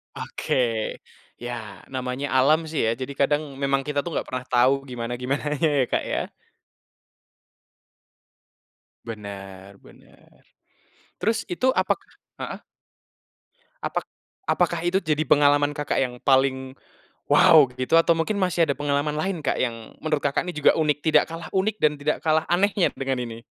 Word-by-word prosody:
Oke. - - -4 0.9
Ya 115 -6 -7
namanya 130 +1 -3
alam 150 +5 +5
sih 155 - -2
ya, 110 - +2
jadi 135 +2 -4
kadang 145 +2 +3 0.2
memang 140 0 +2
kita 145 -1 0
tuh 170 - -4
nggak - - -2
pernah 130 0 -4
tahu 125 +2 +5 0.2
gimana-gimananya 125 +6 -2
ya, - - +4
Kak, - - +1
ya. - - 0 2.9
Bener, 100 -3 -9
bener. - - -20 0.9
Terus 225 +1 0
itu 200 +8 0
apakah 260 - 0 0.3
heeh? - - -5 1.2
Apak - - -2 0.4
apakah 170 -1 +1
itu 185 - +2
jadi 155 -2 0
pengalaman 145 0 +4
Kakak 145 0 -1
yang 125 -2 -1
paling 130 -1 +2 0.6
wow 155 -3 +8 0.2
gitu 130 +6 +2
atau 165 0 +5
mungkin 165 +6 -1
masih 180 -4 +1
ada 140 - 0
pengalaman 145 +1 -1
lain 175 +2 -2
Kak, 145 - -1
yang 115 -3 -4
menurut 155 -2 +1
Kakak 140 +2 0
nih 180 -1 -5
juga 150 - +5
unik, 150 -2 +1
tidak 160 - +4
kalah 165 -1 -7
unik 195 +3 0
dan 150 -1 +4
tidak 145 +1 -1
kalah 155 0 +2
anehnya 195 +1 +2
dengan 135 -1 -2
ini? 115 0 -9
145 Hz, 145 wpm, -24 LUFS, 130-160 Hz, 2.9 s, wow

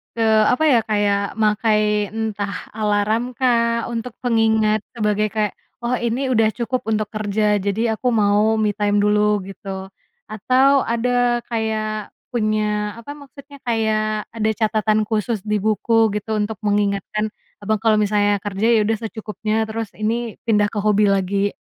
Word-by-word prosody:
eee, 220 -1 +3
apa 255 - 0
ya, 240 - +5
kayak 205 -1 0
makai 210 -1 +1
entah 210 -2 -3 0.2
alarmkah 230 +3 0
untuk 235 0 -4
pengingat 220 -2 +2 0.2
sebagai 210 -1 +1
kayak, 210 -2 0 0.3
"Oh, 245 +1 0
ini 245 +3 -1
udah 225 -2 +4
cukup 250 +1 -2
untuk 215 -1 0
kerja, 210 -1 0
jadi 200 +3 -2 0.2
aku 250 - -3
mau 210 0 +3
me 215 -1 +1
time 205 0 0
dulu," 210 -1 +2
gitu. 190 0 -7 0.4
Atau 260 +6 +3
ada 240 +1 +1
kayak 215 -2 -2 0.2
punya 215 -2 0
apa 260 +5 -9
maksudnya, 280 0 -14
kayak 215 -2 0
ada 220 -1 0
catatan 215 0 +1
khusus 220 0 -1
di 210 +1 -1
buku 220 0 +2
gitu 210 +1 -4
untuk 210 0 -2
mengingatkan 205 0 0 0.3
Abang 215 +1 -2
kalau 220 -2 +3
misalnya 205 -1 +2
kerja, 205 +3 -1
ya 220 -3 +4
udah 225 - +1
secukupnya, 220 0 -3
terus 220 0 -4
ini 230 +1 -2
pindah 210 -2 +2
ke 220 - -7
hobi 210 0 +3
lagi. 195 +1 +1
215 Hz, 145 wpm, -20 LUFS, 210-225 Hz, 0.4 s, ya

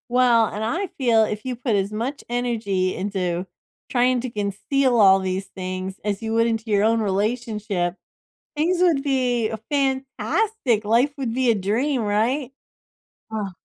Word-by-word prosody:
Well, 240 -2 +4
and 210 +1 -5
I 340 - -1
feel 235 -4 +4
if 215 +1 -3
you 255 -1 -2
put 240 -2 -1
as 200 +1 0
much 240 +7 -4
energy 225 -6 -1
into 185 -2 -2 0.4
trying 250 0 +2
to 255 - -4
conceal 235 +5 0
all 195 -2 +7
these 190 +1 -3
things 185 0 -5
as 205 -1 -2
you 225 0 -3
would 230 +1 +3
into 225 -1 -1
your 205 -1 +3
own 225 +1 +3
relationship, 210 -3 -1 0.6
things 345 +4 +1
would 330 -6 +3
be 250 -5 +1
a 220 - -4
fantastic, 270 - 0
life 235 +7 +3
would 255 -5 -3
be 255 -1 +2
a - - +4
dream, 230 +7 0
right? 230 +6 0 0.8
Oh. 210 -3 -3
225 Hz, 160 wpm, -23 LUFS, 205-255 Hz, 0.8 s, all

